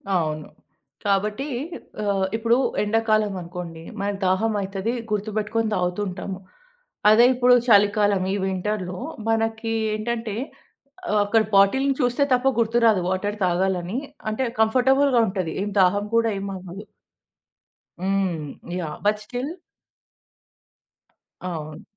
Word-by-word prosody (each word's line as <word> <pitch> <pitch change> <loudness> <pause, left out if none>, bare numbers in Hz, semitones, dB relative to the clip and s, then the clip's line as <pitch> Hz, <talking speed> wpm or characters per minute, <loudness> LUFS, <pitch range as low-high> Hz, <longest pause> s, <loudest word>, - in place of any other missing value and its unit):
అవును. 155 -3 -1 0.6
కాబట్టి, 210 +7 0 0.6
ఆహ్, 200 -2 +1
ఇప్పుడు 230 +2 +2 0.3
ఎండాకాలం 215 -1 +1
అనుకోండి, 170 -1 -7 0.2
మనకి 200 0 -2
దాహం 200 +5 +2
అయితది 195 +4 -3 0.2
గుర్తుపెట్టుకొని 215 +1 -1
తాగుతుంటాము. 185 +1 -3 0.7
అదే 220 +3 +7
ఇప్పుడు 250 0 +5
చలికాలం 205 -2 +4
ఈ - - 0
వింటర్‌లో 190 -1 -2 0.3
మనకి 225 0 0 0.2
ఏంటంటే 225 -1 -3 0.8
ఆహ్, 210 - +3
అక్కడ 220 +2 +3
బాటిల్‌ని 265 +8 +4
చూస్తే 245 +3 +2
తప్ప 250 +1 +2
గుర్తురాదు 230 -3 +3
వాటర్ 205 +3 -2
తాగాలని 180 +2 0 0.3
అంటే, 215 +5 -1 0.2
కంఫర్టబుల్‌గా 255 +3 +4
ఉంటది 185 -4 -2
ఏం 205 - -3
దాహం 200 +3 +3
కూడా 230 0 +3
ఏం 200 - -5
అవ్వదు. 185 +2 -9 1.2
హ్మ్. 190 -5 0 0.3
యాహ్! 155 -4 -4
బట్ 210 0 +2
స్టిల్ 250 +7 -4 1.9
అవును. 155 -4 -6
205 Hz, 105 wpm, -23 LUFS, 185-225 Hz, 1.9 s, అదే